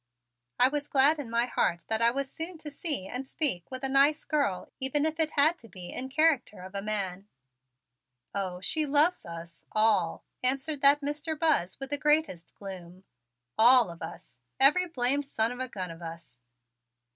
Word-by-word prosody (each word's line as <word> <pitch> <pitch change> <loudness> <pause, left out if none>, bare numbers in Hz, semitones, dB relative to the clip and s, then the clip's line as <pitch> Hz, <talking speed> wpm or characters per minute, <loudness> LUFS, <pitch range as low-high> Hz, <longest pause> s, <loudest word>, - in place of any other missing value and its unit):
I 250 - +7
was 290 +1 -3
glad 290 +3 +4
in 270 -5 -6
my 235 +1 +1
heart 170 -8 -1
that 220 0 -1
I 230 - +5
was 270 +2 -4
soon 330 +2 -4
to 305 -1 -9
see 285 - -2
and 255 +4 -5
speak 265 - 0
with 260 0 -7
a - - +1
nice 280 +3 +3
girl 280 - -2
even 275 +3 +1
if 315 +1 -2
it 315 -1 +2
had 315 +4 +3
to 230 - -15
be 180 -3 -9
in 260 +1 -4
character 270 - +1
of 185 +1 -11
a 200 - -3
man. 200 -2 -3 1.1
"Oh, 185 -2 -4
she 305 - 0
loves 300 - +3
us 170 0 -10
all," 210 -6 +1 0.2
answered 275 +3 0
that 285 +1 +6
Mr. 295 +2 -3
Buzz 295 - 0
with 270 0 -6
the 290 - -1
greatest 300 - 0
gloom. 185 -2 -10 0.6
"All 240 -3 +6
of 170 - -13
us 160 -6 -10 0.2
every 330 +7 +6
blamed 275 -2 +1
son 225 -4 -1
of 245 - -8
a 255 - -2
gun 185 -5 -6
of 165 +1 -12
us." 165 -7 -10
260 Hz, 185 wpm, -28 LUFS, 190-295 Hz, 1.1 s, I